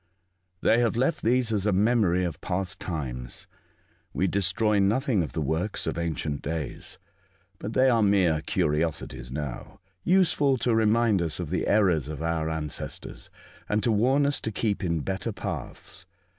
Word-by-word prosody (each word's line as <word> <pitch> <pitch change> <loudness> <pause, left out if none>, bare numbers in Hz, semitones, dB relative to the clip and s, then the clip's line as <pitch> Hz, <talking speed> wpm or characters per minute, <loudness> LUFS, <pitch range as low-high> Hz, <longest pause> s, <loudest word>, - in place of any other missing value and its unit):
'' 90 0 -47
They 115 - +4
have 120 -1 +1
left 135 +7 +1
these 120 0 +2
as 105 -1 +1
a - - +3
memory 100 -3 +2
of 80 -4 -5
past 90 0 -2
times. 65 -8 -5 0.7
We 95 - +1
destroy 100 +3 +2
nothing 110 +2 +2
of 80 - -4
the 80 - -1
works 80 +8 -1
of - - -2
ancient 80 -3 -2
days; 80 -2 -5 0.6
but 110 - -5
they 130 +2 +4
are 120 -3 +4
mere 95 -6 +3
curiosities 75 -7 -1
now, 70 -3 -6 0.2
useful 165 -7 +3
to 120 0 +1
remind 110 -2 +3
us 80 -1 -2
of 85 -3 -4
the 90 - -1
errors 90 -9 +3
of 75 0 -5
our 80 -1 -1
ancestors, 80 -2 -5 0.4
and 105 0 +1
to 115 - +2
warn 130 +7 +3
us 145 0 0
to 110 - -3
keep 105 -2 -1
in 85 -3 0
better 95 +7 -3
paths. 100 - -7
95 Hz, 165 wpm, -26 LUFS, 80-115 Hz, 0.7 s, They